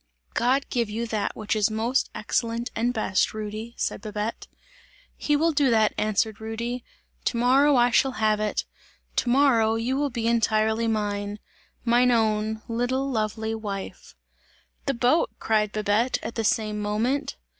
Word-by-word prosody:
"God 260 +3 +2
give 235 -4 0
you 225 +3 -3
that 220 -3 -2
which 215 0 -2
is 210 -1 +2
most 225 +4 0
excellent 230 +2 -2
and 235 +2 +1
best, 215 -3 0
Rudy!" 215 +2 -6
said - - -2
Babette. 215 +1 -4 0.7
"He 295 - 0
will 325 +3 +3
do 285 -3 +2
that," 220 -2 +3
answered 215 +1 0
Rudy, 235 +2 -4 0.4
"to 235 - 0
morrow 270 +4 +4
I 245 0 +4
shall 265 +2 +3
have 215 -2 +1
it! 210 -1 -1 0.5
To 245 - +1
morrow 240 -4 +4
you 235 +4 -1
will 285 +1 0
be 235 -3 -3
entirely 220 -1 +2
mine! 205 -1 -2 0.5
Mine 245 +1 +4
own, 220 -2 +1
little, 255 +4 -1
lovely 220 -1 -1
wife!" 205 -3 -6 0.7
"The 275 - +1
boat!" 250 +7 +3
cried 215 -2 +1
Babette 215 +4 +1
at - - -4
the 225 - -2
same 215 0 0
moment. 220 +7 -1
225 Hz, 155 wpm, -25 LUFS, 215-245 Hz, 0.7 s, morrow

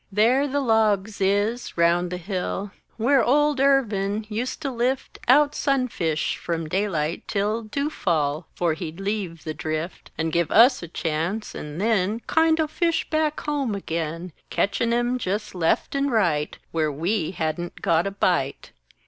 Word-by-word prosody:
There 240 +8 +3
the 285 +1 0
logs 220 -4 +1
is, 205 +5 0
round 170 +1 +3
the 180 - -3
hill, 190 +2 -3 0.3
Where 245 +3 +3
"Old 295 +2 +3
Irvin" 215 -7 +2
ust 245 +8 -3
to 275 - -1
lift 255 +2 -2
Out 290 +3 +5
sunfish 255 - 0
from 165 -2 -3
daylight 170 -3 -1
till 210 +2 0
Dew 280 +7 -3
fall 155 - -1
'fore 170 -2 +1
he'd 160 +1 -6
leave 195 -5 -3
"The 155 - -4
Drift" 155 +3 -4
And 160 0 -1
give 170 -2 +1
us 245 +4 +6
a 170 - -6
chance 165 +6 -2
and 150 +2 -7
then 215 0 +1
Kindo' 320 +2 +2
fish 330 +1 0
back 310 -1 0
home 280 -7 -1
again, 165 -2 -4 0.2
Ketchin' 230 +3 0
'em 240 +1 +1
jes 205 +3 -2
left 170 -3 0
and 280 0 0
right 170 -10 +1
Where 155 -2 0
we 165 +4 -1
hadn't 175 0 -4
got 165 +3 +2
"a - - -2
bite!" 175 -8 0
200 Hz, 155 wpm, -24 LUFS, 170-250 Hz, 0.3 s, us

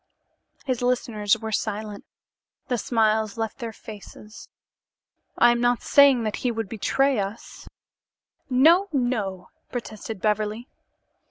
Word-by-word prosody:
His 255 -3 -2
listeners 230 -4 +1
were 220 0 -6
silent. 210 -1 -3 0.6
The 245 -2 0
smiles 220 -1 +1
left 225 +2 -4
their 235 -2 -5
faces. 210 0 -12 0.9
"I 240 - +6
am 240 0 0
not 245 0 +1
saying 275 -4 +5
that 215 -1 -2
he 250 - -1
would 225 -2 -3
betray 265 +4 +1
us 200 +3 -6 0.4
" - - -52 0.2
"No, 355 +5 +6
no!" 220 - -2 0.2
protested 220 -3 -6
Beverly. 215 +3 -1
225 Hz, 120 wpm, -24 LUFS, 210-245 Hz, 0.9 s, I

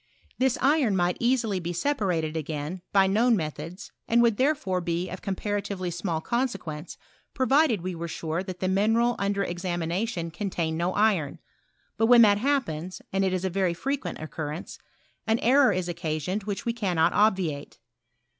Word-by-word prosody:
This 260 -1 +2
iron 270 -6 +3
might 175 -1 +1
easily 235 -5 +1
be 175 0 -4
separated 175 - -1
again 155 +3 -4
by 195 -1 +5
known 225 +4 +3
methods, 165 +4 -6 0.2
and 235 - +3
would 230 -3 +3
therefore 255 -10 +1
be 170 +1 -2
of 185 - -7
comparatively 200 -2 -3
small 170 -2 -2
consequence, 190 -10 -3 0.4
provided 265 - +3
we 185 +1 -3
were 170 0 -5
sure 160 +1 -3
that 185 -1 -7
the 185 - +1
mineral 225 +5 +2
under 200 0 0
ex 175 0 -5
amination 175 0 -2
contained 175 -5 -2
no 175 +2 0
iron; 200 -9 +2 0.6
but 225 +1 +3
when 240 -1 +8
that 205 -1 +5
hap 275 +2 +2
pens 160 +4 -6
(and 195 0 +2
it 190 - +1
is 185 0 -1
a - - +1
very 185 -2 0
frequent 275 +8 -3
occurrence), 155 +1 -6 0.5
an 225 +1 +3
error 260 +1 +4
IS 185 -2 -1
occasioned 170 +3 -3
which 205 -2 -4
we 235 - 0
cannot 180 -7 +1
obviate. 185 -9 +1
190 Hz, 165 wpm, -26 LUFS, 170-225 Hz, 0.6 s, when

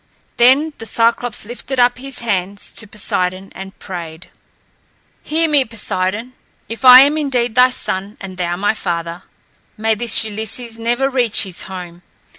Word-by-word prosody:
Then 270 +6 +4
Cyclops 230 +1 0
lifted 250 +3 -5
up 245 0 +3
his 270 -1 -7
hands 200 -3 -3
to 225 - -8
Poseidon 190 -2 -2
and 195 0 -10
prayed: 170 -2 -8 0.9
"Hear 325 +2 0
me, 295 -3 +3
Poseidon, 220 0 -3 0.3
if 230 +3 -7
I 255 0 +11
am 290 +3 +3
indeed 250 -5 -1
thy 250 +2 +5
son 200 -4 -4
and 190 -1 -8
thou 175 -1 -2
my 205 +4 0
father. 170 -3 -4 0.6
May 220 +1 +1
this 230 +1 +3
Ulysses 220 +2 -6
never 240 +4 0
reach 250 -5 +2
his 185 -3 -3
home! 180 -2 -9
225 Hz, 145 wpm, -17 LUFS, 190-250 Hz, 0.9 s, I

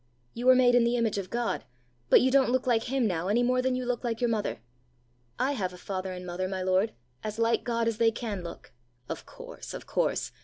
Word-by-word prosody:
You 245 +2 -3
were 255 - +9
made 250 -1 +5
in 245 -1 +5
the 235 +1 +2
image 225 -4 +1
of 185 -2 -6
God, 235 +1 -1 0.5
but - - +7
you 260 - +3
don't 270 -1 +4
look 255 +1 +1
like 235 -3 +2
him 265 -1 +1
now 180 -3 -1
any 225 +5 +3
more 255 +1 +2
than 255 0 +1
you 255 0 -2
look 245 0 -2
like 230 -2 -2
your 240 -1 +1
mother. 215 -2 -1 0.8
I 265 +2 +1
have 190 -9 -2
a - - -10
father 190 0 -4
and 180 0 -7
mother, 180 +1 -3
my 190 -1 -3
lord, 185 +4 +2 0.3
as 215 0 -4
like 230 0 +2
God 230 -1 0
as 225 -2 -1
they 230 -1 +5
can 220 -5 -4
look!" 170 - -9 0.4
"Of - - -6
course! - - -9
of - - -8
course! - - 0
230 Hz, 240 wpm, -28 LUFS, 195-245 Hz, 0.8 s, were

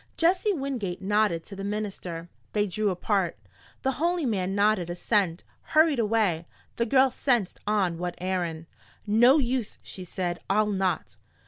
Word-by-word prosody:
Jesse 365 +5 +3
Wingate 260 - -3
nodded 195 -4 +1
to 200 - -10
the 195 - -6
minister. 195 -5 -4 0.3
They 205 -1 +2
drew 210 +2 0
apart. 185 -1 0 0.5
The 265 - +2
holy 340 -1 +1
man 195 -5 0
nodded 205 -4 +2
assent, 175 -1 0 0.2
hurried 310 -4 +3
away 210 -7 +1 0.3
the 235 - +1
girl 260 +2 +4
sensed 240 -7 0
on 190 -5 +1
what 175 0 -3
errand. 175 -3 -2 0.4
"No 240 +7 +6
use!" 250 -5 -1
she 185 - -8
said. 175 -1 -3
"I'll 210 +2 +3
not!" 190 -4 -1
205 Hz, 145 wpm, -27 LUFS, 180-235 Hz, 0.5 s, No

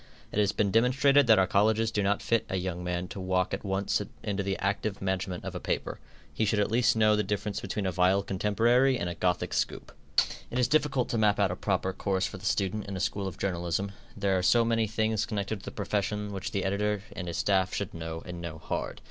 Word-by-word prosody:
It - - -1
has 105 -1 +3
been 105 -2 0
demonstrated 130 +4 +4
that 110 -2 +7
our 95 - +5
colleges 110 +4 +2
do 105 - 0
not 100 +1 +1
fit 115 -2 +2
a - - -2
young 90 -1 -3
man 90 0 -2
to - - -7
walk 95 0 0
at 95 - -3
once 95 0 0 0.2
into 100 -2 -1
the 100 0 -1
active 100 +1 -1
management 95 -1 -2
of - - -4
a - - -4
paper. - - -3 0.3
He - - 0
should 105 0 +1
at 105 +1 +1
least 115 0 +3
know 110 -1 +4
the 105 - +2
difference 105 0 -2
between 100 +1 -3
a 95 - +1
vile 95 +2 +3
contemporary 115 +7 +2
and 85 - -2
a 85 - -2
Gothic 90 +1 -1
scoop. - - -2 0.6
It 120 - -4
is 125 -2 +3
difficult 145 -3 +2
to 115 - 0
map 105 -1 +3
out 100 -3 +3
a - - -2
proper 95 -1 -1
course 95 -1 0
for - - -5
the - - -10
student 100 +1 0
in 100 -1 -4
a - - -4
school 95 +2 -1
of 95 - -6
journalism, 90 +1 -1 0.3
there 100 -1 +1
are 90 - +1
so 115 +6 +4
many 115 -1 +2
things 110 0 0
connected 105 0 -2
with 100 - -14
the - - -4
profession 105 0 -2
which 95 - -4
the 100 - -2
editor 105 +1 0
and 90 - -5
his 85 - -3
staff 95 -2 +2
should 100 - -3
know 80 0 -6
and 90 -1 -7
know 85 -2 -6
hard. 75 - -4
100 Hz, 240 wpm, -29 LUFS, 95-110 Hz, 0.6 s, that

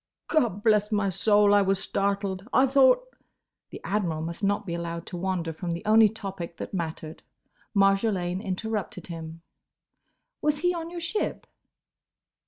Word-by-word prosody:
"Gobblessmysoul! 210 - +3
I 205 - +6
was 195 0 +2
startled! 195 0 -2
I 260 - +5
thought—" 270 - +3 0.5
The - - -9
Admiral 175 -6 -1
must 170 +5 -6
not 205 +1 +1
be 170 - -4
allowed 170 0 -4
to - - -7
wander 175 -3 -2
from 170 +1 -4
the 170 +5 -6
only 220 0 +6
topic 195 -5 -7
that - - -7
mattered. 160 -3 -5 0.5
Marjolaine 195 -2 +2
interrupted 205 -2 -4
him. 165 -1 -8 1.0
"Was 300 0 +1
he 355 +4 +1
on 335 -1 -5
your 345 0 -6
ship?" 345 +6 -2
195 Hz, 135 wpm, -26 LUFS, 175-220 Hz, 1.0 s, I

